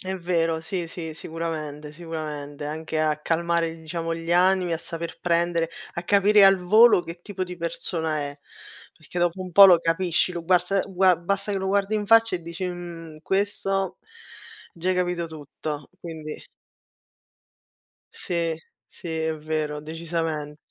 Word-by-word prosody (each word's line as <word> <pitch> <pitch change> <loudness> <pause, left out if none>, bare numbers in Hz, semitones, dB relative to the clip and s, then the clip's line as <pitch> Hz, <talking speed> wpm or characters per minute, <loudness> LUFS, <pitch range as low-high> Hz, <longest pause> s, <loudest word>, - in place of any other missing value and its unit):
È 190 0 -4
vero, 165 -2 0
sì, 170 +1 -3
sì, 165 -1 -6
sicuramente, 155 -2 -5
sicuramente, 150 -3 -6
anche 155 +1 -3
a 155 -1 +2
calmare 165 +1 0
diciamo 165 0 -3
gli 165 0 -6
animi, 180 0 +3
a 165 - 0
saper 170 0 -6
prendere, 170 -1 +1 0.2
a 170 - -4
capire 205 +2 +5
al 195 0 +7
volo 215 +4 +6
che 170 0 -9
tipo 195 -1 -5
di 180 -1 -5
persona 165 -1 -2
è. 145 0 -5 0.6
Perché 165 +2 -7
dopo 175 +2 +1
un 185 - -5
po' 200 +3 +9
lo 175 -3 +6
capisci, 170 +2 +1
lo 170 -2 -5
guars 180 +2 +2
gua 185 -1 +4
basta 200 +4 -2
che 200 - 0
lo 190 - -3
guardi 200 +2 +1
in 210 -1 -2
faccia 225 -3 +5
e 175 - -11
dici: 170 +3 -6
"Mhmm, 170 -3 -8
questo" 195 0 -1 0.8
già 170 +2 -3
hai - - +2
capito 180 -2 -1
tutto, 150 -1 -7
quindi 160 -3 -7 1.7
Sì, 170 -2 -2 0.3
sì, 175 - -10
è 160 0 -1
vero, 155 -1 -3
decisament 160 -1 -3
170 Hz, 155 wpm, -25 LUFS, 160-185 Hz, 1.7 s, po